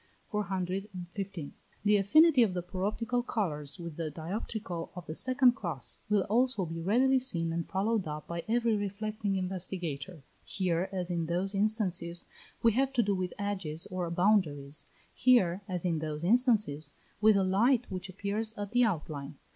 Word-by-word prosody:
415. 190 -3 -4 0.3
The 210 0 +5
affinity 285 - +6
of 205 -6 +3
the 180 - -2
paroptical 215 +7 -1
colours 150 - -2
with 170 -3 -7
the 165 -2 -2
dioptrical 175 +2 -5
of 180 -2 -7
the 155 - -5
second 255 - +4
class 170 - -4
will 205 -2 +3
also 230 -1 +2
be 165 0 -5
readily 255 +9 +3
seen 165 -10 +2
and 170 0 -2
followed 200 0 0
up 150 0 -5
by 170 0 -4
every 230 0 +2
reflecting 205 0 -2
investigator. 180 -4 -3 0.2
Here, 185 -1 -1
as 180 -2 -3
in 170 -2 -1
those 180 +4 0
instances, 195 -5 0 0.4
we 230 - +6
have 265 +4 +1
to 240 -3 +3
do 200 -1 +1
with 185 -1 -3
edges 190 -6 -3
or 180 -2 -2
boundaries; 165 -6 +1 0.3
here, 205 -8 +4
as 180 -2 -3
in 165 -3 +1
those 155 0 -4
instances, 205 - +2 0.3
with 215 -1 +6
a 195 - +3
light, 230 +7 +3
which 185 0 -5
appears 205 +4 -3
at 205 0 -4
the 245 +1 +4
outline. 150 -8 -2
190 Hz, 160 wpm, -31 LUFS, 170-215 Hz, 0.4 s, affinity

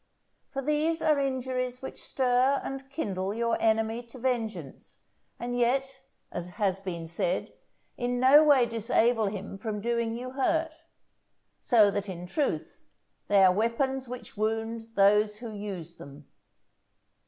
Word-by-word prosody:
For 275 0 -4
these 305 +3 +1
are 305 -2 +3
injuries 255 -2 -2
which - - -6
stir 260 +1 +2
and 270 0 -6
kindle 200 - -3
your 230 0 +1
enemy 225 +1 +1
to 235 - -11
vengeance, 225 - -4 0.4
and 245 +1 -3
yet, 265 +2 0 0.3
as 175 0 -4
has 195 -2 +1
been 175 -4 -5
said, - - -2 0.4
in 245 0 -1
no 270 +4 +7
way 285 -5 +5
disable 230 0 +1
him 195 -1 -6
from 215 0 -3
doing 235 +1 -1
you 255 +1 -6
hurt; 320 +4 0 0.9
so 215 -6 +5
that, 200 0 -3
in 175 -1 -6
truth, 285 - -2 0.4
they 200 -1 +5
are 185 -1 +6
weapons 255 +5 0
which 250 -1 -8
wound 225 +1 -2
those 210 +1 +4
who 225 0 -8
use 190 -5 -6
them. 140 +1 -12
235 Hz, 140 wpm, -28 LUFS, 205-265 Hz, 0.9 s, no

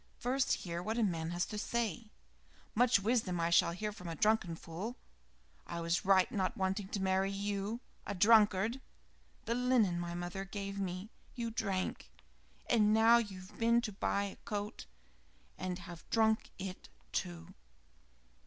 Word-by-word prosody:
First 260 +2 +1
hear 170 -1 -3
what 220 +5 -2
a 235 - +3
man 165 -5 0
has 175 +1 0
to 210 - -5
say 235 0 -2 0.3
" - - -34 0.3
"Much 245 -1 +4
wisdom 205 -4 +1
I 170 0 +1
shall 170 - +5
hear 210 +5 -3
from 200 -4 -9
a 165 - -4
drunken 210 -2 +2
fool. 185 +10 -6 0.7
I 170 - -4
was 170 +1 0
right 190 -1 +6
in 230 - -4
not 190 -1 0
wanting 190 +1 -1
to 200 - -3
marry 190 0 +2
you 200 +3 -2 0.3
a 205 - -2
drunkard. 215 +3 +4 0.6
The 230 - 0
linen 240 -8 +2
my 175 0 -4
mother 175 +2 -4
gave 200 0 -5
me 190 +3 -4 0.2
you 235 -2 -3
drank; 195 -4 -2 0.6
and 215 -2 +4
now 225 +2 +7
you've 195 -4 -6
been 235 +1 +4
to 230 -3 -3
buy 200 0 0
a 200 - -5
coat 205 -1 -5 0.7
and 180 -1 -3
have 175 -2 -10
drunk 220 -1 +2
it, 190 - -7 0.2
too!" 85 -1 -4
200 Hz, 160 wpm, -34 LUFS, 180-220 Hz, 0.7 s, now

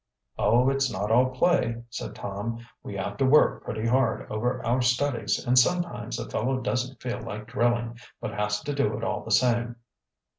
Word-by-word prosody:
"Oh, 125 +3 +4
it's 135 -1 +1
not 100 +3 -2
all 125 +3 +5
play," 130 -4 +1
said - - -6
Tom. 115 +4 -5 0.2
"We 100 - -7
have 100 +1 -4
to 135 - +2
work 150 +3 +4
pretty 110 +1 -4
hard 120 -1 +1
over 110 +3 -1
our 120 +2 +2
studies 120 -2 0
and 125 +1 +5
sometimes 175 +6 0
a - - -5
fellow 130 +4 -1
doesn't 125 +2 -2
feel 125 -1 -4
like 105 +1 -6
drilling, 120 0 0 0.2
but 110 - -5
has 105 0 -1
to 145 - -3
do 140 -6 0
it 115 - -6
all - - -2
the - - -9
same." 120 +1 +2
120 Hz, 185 wpm, -26 LUFS, 110-130 Hz, 0.2 s, all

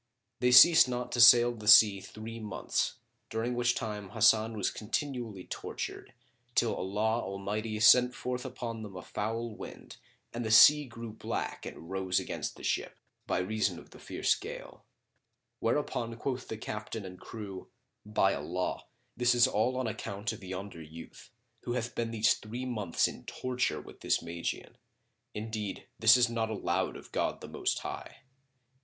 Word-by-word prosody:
They 125 - +3
ceased 160 +3 +8
not 125 0 -3
to 120 - +2
sail 120 0 +8
the 105 -3 -10
sea 105 -1 +8
three 115 +3 -8
months, 105 -3 -2 0.3
during 115 +2 -2
which 120 0 +1
time 105 -3 -5
Hasan 110 +1 +3
was 100 - 0
continually 115 -4 -4
tortured - - -6 0.4
till - - +2
Allah 110 +4 -1
Almighty 105 +3 -4
sent 125 +2 +6
forth 125 0 -4
upon 120 -3 -6
them 105 -3 -9
a 90 - -7
foul 115 +2 -3
wind - - -10 0.4
and 120 +1 -3
the 110 - -3
sea 150 +7 +8
grew 115 -2 -8
black 110 - -4
and 80 - -10
rose 95 -1 0
against - - -5
the - - -13
ship, - - -2 0.3
by - - 0
reason 105 +3 -1
of - - -14
the - - -14
fierce - - 0
gale; - - -9 0.8
whereupon 115 -2 -1
quoth 125 0 -4
the 110 - -5
captain 105 -1 -6
and 90 -1 -10
crew,[FN#28] 110 +3 -11
"By 95 - +4
Allah, 90 +6 -3 0.3
this 125 0 +3
is 120 - +6
all 125 +5 0
on 130 - -1
account 110 0 -4
of 105 - -11
yonder 95 -2 -7
youth, 80 +8 -12 0.3
who 120 - -4
hath 120 -1 -3
been 115 -1 -2
these 115 +1 +3
three 120 +4 -7
months 105 -9 0
in - - -9
torture 125 0 -2
with - - -13
this - - +1
Magian. 85 0 -5 0.6
Indeed, 105 -2 -5
this 110 +2 +7
is 125 0 +4
not 115 -1 -2
allowed 110 -3 -1
of - - -14
God - - -1
the - - -8
Most - - -1
High." - - -7
110 Hz, 165 wpm, -30 LUFS, 105-120 Hz, 0.8 s, ceased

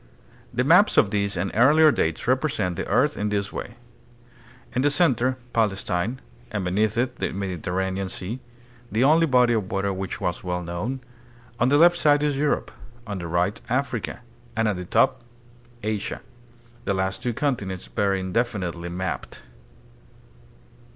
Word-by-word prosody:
The 125 - 0
maps 180 +9 +5
of 100 - +5
this 100 -2 0
and 90 +2 -1
earlier 150 +7 +6
dates 80 - -1
represent 130 - +1
the - - -4
earth - - +2
in 105 0 -1
this 100 -1 -1
way: 120 - -6 1.0
In 125 - +1
the 145 - +4
center, 130 -5 +2 0.2
Palestine, 105 +1 0 0.3
and 100 -5 -3
beneath 105 +4 +1
it 125 +1 0
the - - -2
Mediterranean 95 0 -2
Sea, 100 +7 -5 0.5
the 110 +4 +2
only 160 +4 +5
body 125 -3 +4
of 105 -5 -1
water 100 0 0
which 95 0 -4
was 90 - -2
well 90 -1 -2
known; 105 +10 -4 0.6
on 125 - +3
the 145 - +5
left 175 +2 +6
side 145 -2 +4
is 145 -2 +1
Europe; 145 +1 0 0.3
on 100 -3 -4
the 85 - -5
right, 90 +5 0
Africa; 125 -2 -2 0.3
and 110 0 +1
at 105 -3 0
the 90 - -5
top, - - +2 0.6
Asia 105 -1 -3 0.6
the 100 - 0
last 95 0 -1
two 125 - -1
continents 105 -11 -2
very 100 -1 0
indefinitely 95 -4 -2
mapped. 95 +2 -5
105 Hz, 155 wpm, -24 LUFS, 95-130 Hz, 1.0 s, earlier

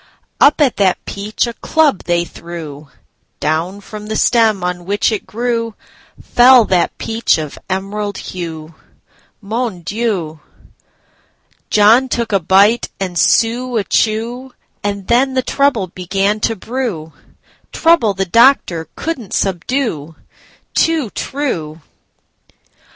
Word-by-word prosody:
Up 295 - +5
at 275 -5 +2
that 190 -3 +3
peach 205 +4 -2
a 235 - -5
club 300 - +1
they 175 0 +1
threw—Down 160 +2 -6
from 210 +1 -9
the 220 - -3
stem 220 -5 +2
on 180 -1 -3
which 205 +4 +1
it 215 - -4
grewFell 235 +1 +1
that 180 -2 +1
peach 225 0 0
of 155 -2 -6
emerald 200 +2 -3
hue. 165 -3 -7 0.7
Mon 220 -3 -3
Dieu! 185 -5 -3 1.3
John 225 +5 +5
took 235 -2 -2
a 195 - +3
bite 200 +7 +3
and 185 -2 -3
Sue 235 +6 +2
a 210 - +1
chew, 235 +5 -1 0.3
And 200 -1 -3
then 260 +4 +2
the 260 - +1
trouble 275 -9 +1
began 195 +4 -1
to 225 +1 0
brew,—Trouble 225 - -2
the 195 +1 -1
doctor 190 - +3
could 330 -3 -3
n't 205 - -11
subdue. 180 - -2 0.6
Too 315 -9 +1
true! 165 - -4
210 Hz, 115 wpm, -16 LUFS, 180-240 Hz, 1.3 s, Up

